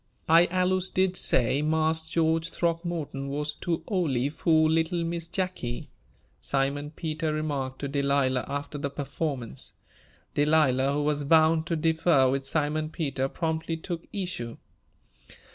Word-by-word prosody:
"I 165 +2 +6
allus 185 +1 +1
did 185 0 +1
say 130 -4 +2
Marse 160 +1 +1
George 160 0 +1
Throckmorton 165 -5 -2
wuz 150 +1 -2
too 165 0 -3
ole 145 - 0
fur 160 0 +3
little 165 +2 +1
Miss 165 0 -3
Jacky," 180 -10 -3 0.5
Simon 135 - -1
Peter 155 0 -3
remarked 145 -4 -2
to 140 - -2
Delilah, 140 -2 +1
after 145 +1 -4
the 140 0 -2
performance. 140 -3 -4 0.6
Delilah, 145 -3 +3
who 145 +1 0
was 145 0 0
bound 160 +2 +4
to 170 - 0
differ 160 -3 +3
with 135 0 -1
Simon 155 +1 0
Peter, 135 -5 -2
promptly 160 0 -2
took 170 0 -6
issue. 180 - -4
155 Hz, 130 wpm, -27 LUFS, 140-165 Hz, 0.6 s, I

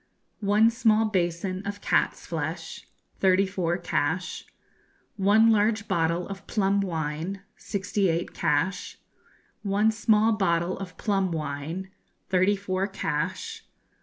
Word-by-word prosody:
One 210 +2 +4
small 225 -2 +3
basin 185 -1 -1
of 205 0 -5
cat's - - +1
flesh 165 +1 -5 0.3
thirty 190 0 +4
four 180 -3 -1
cash. 175 0 -2 0.7
One 215 +3 +5
large 215 0 +2
bottle 170 +1 0
of 195 -1 -8
plum 200 -2 +1
wine 165 +2 -3
sixty 200 -1 -1
eight 165 +1 -1
cash. 165 +5 -1 0.6
One 210 +2 +2
small 220 0 +3
bottle 180 -4 +1
of 190 -2 -8
plum 195 -4 0
wine 160 +4 -4 0.4
thirty 185 +2 +4
four 195 -1 -2
cash. 195 - -3
190 Hz, 115 wpm, -26 LUFS, 170-205 Hz, 0.7 s, One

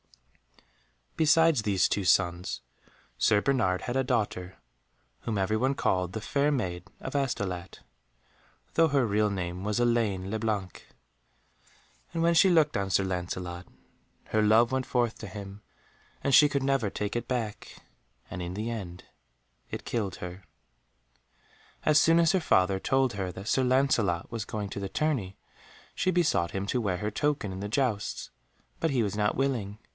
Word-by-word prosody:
Besides 160 -3 +4
these 100 -4 +2
two 100 - -1
sons, 85 0 +1 0.6
Sir 105 - +4
Bernard 115 -10 +1
had 125 - -4
a 135 - +2
daughter 105 -7 -2 0.6
whom 110 -3 -3
every 95 +2 +1
one 130 +4 +1
called 90 -5 0
The 110 - -4
Fair 140 +6 +1
Maid 90 - -2
of 130 - -6
Astolat, 95 -10 -2 0.9
though 165 0 +4
her 140 -4 +2
real 105 0 +2
name 90 -2 -4
was 105 +2 -1
Elaine 110 -6 +1
le 110 - -1
Blanc. 105 -5 -3 1.2
And 165 0 -1
when 170 0 +4
she 180 +3 +6
looked 160 -4 +3
on 100 -1 -1
Sir 95 - +2
Lancelot, 90 -1 -4 0.6
her 110 - +2
love 110 +3 +4
went 130 -1 -1
forth 120 -2 0
to 110 - -7
him 100 +1 -9 0.6
and 140 - +1
she 145 +2 +8
could 140 -2 -1
never 135 -6 +1
take 105 +2 -4
it 120 - -2
back, 115 -5 -4 0.5
and 90 - -5
in 90 +1 -5
the 110 +3 -3
end 95 -6 -6 0.7
it - - -6
killed 105 -6 -2
her. 90 +2 -8 1.4
As 155 0 +5
soon 165 +1 +5
as 165 -1 +4
her 190 - +2
father 95 - +2
told 135 +2 +1
her 95 -2 -3
that 95 +2 -9
Sir 130 - +2
Lancelot 125 -10 +1
was 115 -2 -4
going 105 -2 -4
to 100 - -5
the 100 -1 -4
tourney 125 -12 -1 0.6
she 185 - 0
besought 170 - +2
him 95 +3 -3
to 125 +5 -1
wear 95 -5 -1
her 105 +3 -3
token 140 -2 -1
in 95 - -6
the 100 +1 -4
jousts, 110 -4 -1 0.5
but 165 - +1
he 130 -5 +1
was 105 -1 -2
not 105 0 +1
willing. 120 -7 -1
110 Hz, 165 wpm, -28 LUFS, 95-135 Hz, 1.4 s, she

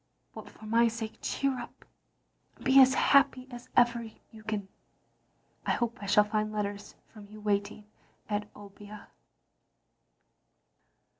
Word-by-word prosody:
But 215 -2 -10
for 215 - -15
my 230 +2 +3
sake 225 -1 -5
cheer 275 -2 -1
up, 240 - -11 0.7
and - - -16
be 265 +1 +7
as 260 0 +5
happy 270 -2 +3
as 245 0 -10
ever 240 -1 +4 0.3
you 220 - -13
can. 210 -2 -3 1.0
I - - 0
hope 240 -2 -2
I 200 - -6
shall 210 +1 +5
find 215 0 -2
letters 205 -1 -4 0.2
from 210 -2 -12
you 215 0 -12
waiting 205 0 -2 0.4
at 210 0 -3
Obbia. 205 +1 -12
215 Hz, 135 wpm, -29 LUFS, 205-240 Hz, 1.0 s, be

